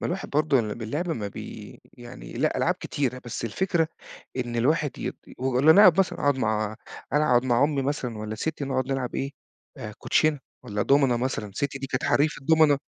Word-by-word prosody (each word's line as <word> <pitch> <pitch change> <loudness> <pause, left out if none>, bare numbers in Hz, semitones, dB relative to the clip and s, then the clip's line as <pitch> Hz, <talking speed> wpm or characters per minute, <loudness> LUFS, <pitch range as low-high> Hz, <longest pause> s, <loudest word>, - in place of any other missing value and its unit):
ما - - -2
الواحد 185 +2 -4
برضه 145 -2 +3
ل 105 -2 -3
باللعب 145 +10 -4
ما 105 -10 -3
بي - - -9
يعني 120 - -11
لأ، - - 0
ألعاب - - +2
كتيرة 130 -3 -3
بس 120 - -5
الفكرة 165 - 0 0.5
إن 120 -2 -3
الواحد 145 +4 +1
يت - - -4 0.2
و 130 -1 0
إن 150 - +5
أنا 195 +6 +8
قاعد 185 -5 +8
باسهَر، 190 +1 0
هاقعُد 145 -2 +2
مع 110 -2 -1 0.4
أنا 150 +1 +3
أقعُد 120 0 +4
مع 120 +1 +3
أمي 145 -2 +1
مثلًا 130 -5 -3
والّا 110 0 -5
ستّي 145 +4 -3
نقعد 130 -1 -1
نلعب 130 -2 -2
إيه، 135 +1 -2 0.7
كوتشينة 155 -2 +2 0.2
والّا 105 -4 -3
دومنة 135 -3 +3
مثلًا، 120 -5 -3
ستّي 140 0 -2
دي 135 - -5
كانت 130 - -2
حرّيفة 150 0 +1
دومنة. 160 -3 +5
135 Hz, 195 wpm, -26 LUFS, 120-150 Hz, 0.7 s, أنا